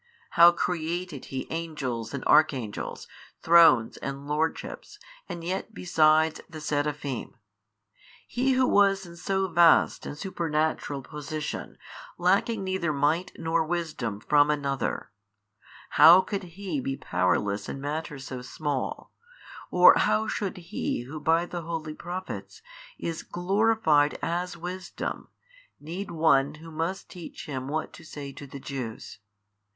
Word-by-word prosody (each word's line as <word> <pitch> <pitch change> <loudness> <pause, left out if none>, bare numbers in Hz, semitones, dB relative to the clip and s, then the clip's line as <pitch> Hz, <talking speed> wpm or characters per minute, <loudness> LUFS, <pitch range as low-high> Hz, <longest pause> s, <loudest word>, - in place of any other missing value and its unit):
how 170 0 +8
created 170 -3 -3
He 130 -1 -5
angels 140 -9 -3
and 140 -2 -5
Archangels 130 -9 +1 0.4
Thrones 165 -9 +6
and 140 0 -6
Lordships 160 - -3 0.3
and 170 - -6
yet 190 +5 -4
besides, 160 -2 +3
the 160 -2 -8
Seraphim? 145 -3 -3 0.9
He 260 +2 +1
Who 255 0 +3
was 195 -1 +3
in 170 -1 -11
so 190 +2 -1
vast 170 -1 +4
and 145 - -6
supernatural 155 -5 -2
position, 150 +1 -6 0.4
lacking 195 +4 +2
neither 190 -4 -1
Might 150 +5 0
nor 165 0 +1
Wisdom 155 -11 -3
from 145 +5 +4
another, 140 -6 -2 0.8
how 175 +3 +9
could 190 -4 -6
He 190 -7 -3
be 135 +1 -3
powerless 90 +3 0
in 135 - -5
matters 145 -1 -4
so 130 -2 -6
small, 140 +1 -4 0.6
or - - +8
how 220 0 +2
should 200 -3 -3
He 170 -7 -3
Who 150 +5 -7
by 165 +3 +2
the 175 0 -5
holy 160 -2 -4
Prophets 180 +4 -7 0.3
is 165 -1 -4
glorified 185 -5 +2
as 180 +2 -2
Wisdom 180 +1 -5 0.5
need 175 +7 -6
one 150 -3 +3
who 165 +1 -12
must 165 +5 -3
teach 180 -3 -9
Him 130 -3 -5
what 155 +2 -3
to - - -12
say 145 -3 -8
to 140 - -10
the 140 +1 -9
Jews? 130 -5 -6
160 Hz, 130 wpm, -27 LUFS, 145-175 Hz, 0.9 s, how